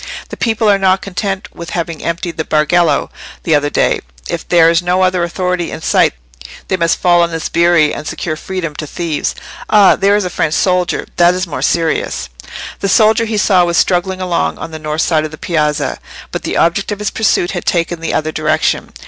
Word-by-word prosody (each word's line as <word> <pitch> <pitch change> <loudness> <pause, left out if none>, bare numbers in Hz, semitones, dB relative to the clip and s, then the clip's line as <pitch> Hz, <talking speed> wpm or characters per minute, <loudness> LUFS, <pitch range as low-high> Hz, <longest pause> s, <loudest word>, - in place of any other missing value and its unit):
"The - - -6
people 225 -1 0
are 200 -1 +4
not 190 0 +2
content 195 0 -4
with 170 0 -8
having 165 -2 -4
emptied 170 0 -3
the 160 - -1
Bargello 160 +3 +1 0.3
the 160 - +1
other 145 -1 +2
day. - - +1 0.3
If - - -4
there 170 -2 +5
is 165 0 +3
no 180 +1 +1
other 185 -1 +1
authority 180 0 -1
in - - -7
sight - - +2 0.5
they 190 - +2
must 170 -3 +1
fall 175 -1 +3
on 170 - +2
the 165 -1 -4
sbirri 170 -2 +2
and 150 - -6
secure 155 -3 -3
freedom 170 -1 -5
to 155 - -5
thieves. 165 -1 -3 0.3
Ah! 205 -3 +6
there 200 +1 +2
is 205 -2 0
a 180 - -3
French 155 -2 0
soldier: 180 -1 +1
that 175 +1 +4
is 185 +1 -1
more 145 -7 -5
serious." 165 - -1 0.5
The 195 - -1
soldier 220 +3 +4
he 220 -1 -2
saw 190 -3 +4
was 170 -1 0
struggling 185 +2 +1
along 180 -2 -1
on 165 - -7
the 160 - -7
north 155 +1 -2
side 155 -2 +1
of 155 - -3
the 155 - -10
piazza, 150 -2 -1 0.3
but - - -4
the - - -3
object 170 +5 +1
of 205 - -2
his 210 -1 -3
pursuit 200 -4 +1
had 175 - -5
taken 170 -1 0
the 165 - -2
other 155 0 -1
direction. 155 0 -1
175 Hz, 210 wpm, -15 LUFS, 160-185 Hz, 0.5 s, Ah